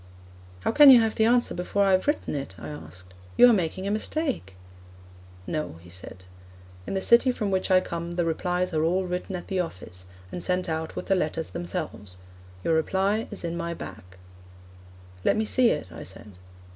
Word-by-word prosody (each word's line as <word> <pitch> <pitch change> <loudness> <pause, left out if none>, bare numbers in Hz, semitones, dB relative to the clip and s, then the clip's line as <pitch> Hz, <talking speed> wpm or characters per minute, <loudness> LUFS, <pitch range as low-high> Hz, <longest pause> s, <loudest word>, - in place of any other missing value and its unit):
'How - - 0
can 295 +3 +8
you 255 -3 +10
have 225 -1 +1
the 220 - +2
answer 240 +1 +3
before 190 +3 0
I 195 - +3
have 185 +5 +2
written 295 - 0
it?' 135 -9 -5
I - - -8
asked. 90 - -11 0.2
'You 245 - +9
are - - +5
making 185 -1 -1
a 200 - -1
mistake.' 215 - -2 0.9
'No,' 155 - -3
he 90 - -14
said. 95 +1 -9 0.6
'In - - -3
the 190 - -1
city 235 +2 +5
from 210 -5 -2
which 190 +1 0
I 185 -1 +5
come 170 -1 -5
the 175 -1 +1
replies 180 +2 -1
are 155 - +1
all 185 +3 +1
written 180 +1 -4
at 175 - -6
the 190 - -1
office, 90 - -6 0.2
and 175 - -4
sent 180 +1 0
out 160 0 -3
with - - -5
the - - +2
letters 165 -3 -1
themselves. 105 - -5 0.5
Your 165 - +1
reply 195 +7 +1
is 205 - -8
in 170 0 -3
my 170 0 -3
bag.' 90 - -10 1.1
'Let - - +3
me 220 - +1
see 245 +2 +3
it,' 145 - -2
I - - -9
said. 95 +3 -10
180 Hz, 195 wpm, -26 LUFS, 155-200 Hz, 1.1 s, you